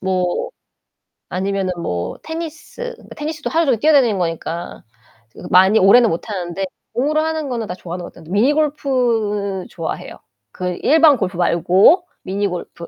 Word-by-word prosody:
뭐 185 -2 -1 0.8
아니면은 190 0 -1
뭐 90 - -3
테니스, 330 +9 -6
그러니까 - - -14
테니스도 305 0 -4
하루종일 300 -8 +2
뛰어다니는 270 -7 +4
거니까 170 -1 -4 0.5
저 - - -14
그 - - -7
많이 190 +4 +6
오래는 220 +4 +6
못 165 - -3
하는데 185 -1 -3 0.3
공으로 295 +6 +1
하는 315 -2 -2
거는 230 -3 -3
다 180 - -5
좋아하는 175 0 -7
것 - - -9
같아요. 160 - -14
미니 215 +8 +3
골프 235 -10 0
좋아해요. 165 -2 -6 0.3
그 180 -1 -4
일반 310 -2 +5
골프 190 -4 -3
말고 185 - +4 0.2
미니 200 +2 -1
골프. 175 -2 -7
205 Hz, 350 characters per minute, -19 LUFS, 180-290 Hz, 0.8 s, 많이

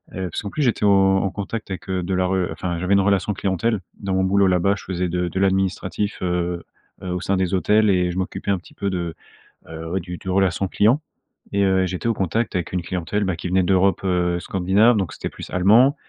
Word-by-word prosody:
Heu, 95 -1 -3
parce - - -3
qu'en 100 - -5
plus, 150 - -2
j'étais 120 -4 +1
au 95 -1 +5
au 95 -1 -1
contact 105 +1 -5
avec, 95 -1 -6
heu, 95 -1 -1
de 95 +2 -2
la 90 0 +1
re 95 -1 0
enfin, 85 +2 -3
j'avais 90 +2 +1
une 100 - +5
relation 100 0 +1
clientèle. 100 +3 0 0.2
Dans 95 -2 -2
mon 95 - +2
boulot, 100 +1 +3
là-bas, 95 +2 +2
je - - -11
faisais 90 -1 -2
de 90 0 -1
de 95 - -3
l'administratif, 95 +1 0
heu 90 -1 -1 0.4
heu, 90 - -4
au 90 0 -2
sein 100 - 0
des 95 0 0
hôtels 105 +3 +3
et 90 -2 +2
je 90 - -6
m'occupais 95 +1 -3
un 95 - +1
petit 90 - -18
peu 100 - -2
de, 85 -3 -3 0.5
heu, 80 0 -7
ouais, 95 - 0
du 90 0 -7
du - - -13
relation 95 0 +1
client 115 +11 +3 0.5
et 100 - +2
heu, 95 -1 +3
j'étais 90 +5 -3
au 115 - +2
contact 100 +3 -1
avec 90 0 -2
une 90 - 0
clientèle, 95 +4 -2
bah, 95 -2 -1
qui 85 - -5
venait 95 +1 +3
d'Europe, 95 +1 +2
heu, 90 -1 +1
scandinave. 100 +5 +3
Donc, 95 -6 -2
c'était - - -5
plus - - -10
allemand, 110 - +5
95 Hz, 240 wpm, -22 LUFS, 90-100 Hz, 0.5 s, au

